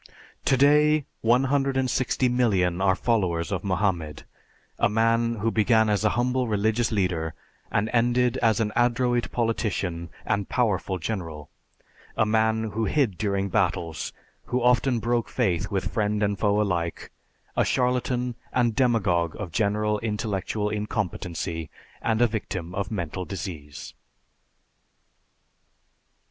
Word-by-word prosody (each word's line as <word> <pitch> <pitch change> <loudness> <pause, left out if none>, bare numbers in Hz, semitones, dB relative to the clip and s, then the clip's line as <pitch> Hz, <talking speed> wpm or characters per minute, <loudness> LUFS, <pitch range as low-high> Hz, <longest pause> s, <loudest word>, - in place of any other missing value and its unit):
Today, 150 +2 +4 0.2
160,000,000 125 -6 +2
are 95 -1 +4
followers 90 -9 0
of - - -2
Mohammed, 90 -6 -1 0.6
a - - +3
man 115 +2 +2
who 115 +1 -1
began 110 0 +3
as 105 0 +1
a 110 - +4
humble 125 +1 +1
religious 110 +2 +1
leader, 90 -6 -1 0.4
and 100 - +1
ended 120 +1 +2
as 115 -4 +2
an 110 -2 0
adroit 120 0 +1
politician 100 -7 -1 0.2
and 100 -3 -1
powerful 100 -6 0
general; 80 -6 -5 0.7
a 110 - +4
man 110 +1 +2
who 110 +3 -1
hid 125 -4 +1
during 100 -2 0
battles, 90 -5 -1 0.3
who 125 0 -1
often 125 +1 +3
broke 120 +1 0
faith 100 -6 0
with 95 -2 -2
friend 105 -2 0
and 100 -1 0
foe 105 -1 +2
alike, 85 -5 -2 0.4
a - - +3
charlatan 125 -1 0 0.2
and 120 -3 +1
demagogue 100 - +2
of 100 -5 -5
general 105 +2 +1
intellectual 105 -1 -2
incompetency, 90 -6 -3 0.3
and 115 +1 +2
a - - +5
victim 95 -6 -4
of 100 0 -2
mental 90 -3 -3
disease. 80 -7 -7
105 Hz, 120 wpm, -25 LUFS, 95-120 Hz, 0.7 s, a